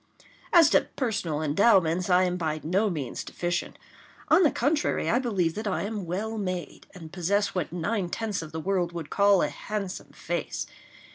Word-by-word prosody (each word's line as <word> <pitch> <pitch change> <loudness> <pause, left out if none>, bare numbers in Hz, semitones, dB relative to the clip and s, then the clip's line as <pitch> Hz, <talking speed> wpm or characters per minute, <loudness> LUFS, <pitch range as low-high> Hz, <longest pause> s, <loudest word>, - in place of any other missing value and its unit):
As 330 -4 +7
to - - +4
personal 175 - -1
endowments, 175 +1 +3
I 180 0 +5
am 180 -1 0
by 155 -3 -2
no 195 +7 +1
means 145 -9 -4
deficient. 175 0 -3 0.5
On - - +6
the 320 - +5
contrary, 295 +5 0
I 240 - +3
believe 195 -10 0
that 215 +3 -4
I 190 - -1
am 205 -3 -4
well 215 +6 -3
made, 185 -5 -5
and 165 -3 -11
possess 200 +3 0
what 180 -5 -2
nine 180 +2 -2
tenths 210 -1 -3
of 160 -1 -8
the 160 - -4
world 175 0 -1
would 165 -3 -6
call 200 -2 +4
a - - 0
handsome 200 -3 -5
face. - - -4
185 Hz, 180 wpm, -27 LUFS, 170-210 Hz, 0.5 s, As